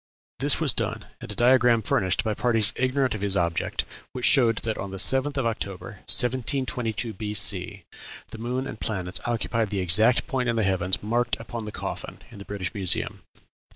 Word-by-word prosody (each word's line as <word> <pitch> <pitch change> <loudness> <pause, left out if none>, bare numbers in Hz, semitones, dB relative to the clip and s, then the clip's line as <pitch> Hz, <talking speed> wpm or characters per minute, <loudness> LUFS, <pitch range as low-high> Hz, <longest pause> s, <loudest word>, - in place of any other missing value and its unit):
This - - +5
was - - +4
done, - - -2
and - - -8
a - - -7
diagram 120 -2 +4
furnished 95 -2 0
by 110 -2 -1
parties 115 -1 +1
ignorant 130 +1 0
of 110 - -6
his 100 -1 +2
object, 85 -2 -1 0.3
which 125 - -3
showed 120 -5 +5
that 110 -1 -1
on 100 - -6
the 95 - -7
7th 135 +7 +3
of 135 - 0
October, 110 -1 -5
1722 125 -3 0
B.C. 100 -2 +1 0.5
the - - -9
moon 125 +3 -3
and 110 - -8
planets 95 -4 -3
occupied 115 -2 -1
the 100 - -3
exact 105 +7 +4
point 130 -5 -2
in 115 - 0
the 110 - +1
heavens 95 0 0
marked 120 +3 -1
upon 115 0 -7
the 105 - -6
coffin - - -6
in 105 - -12
the 100 - -10
British 100 -1 -5
Museum." 95 -5 +1
110 Hz, 185 wpm, -25 LUFS, 100-125 Hz, 0.5 s, This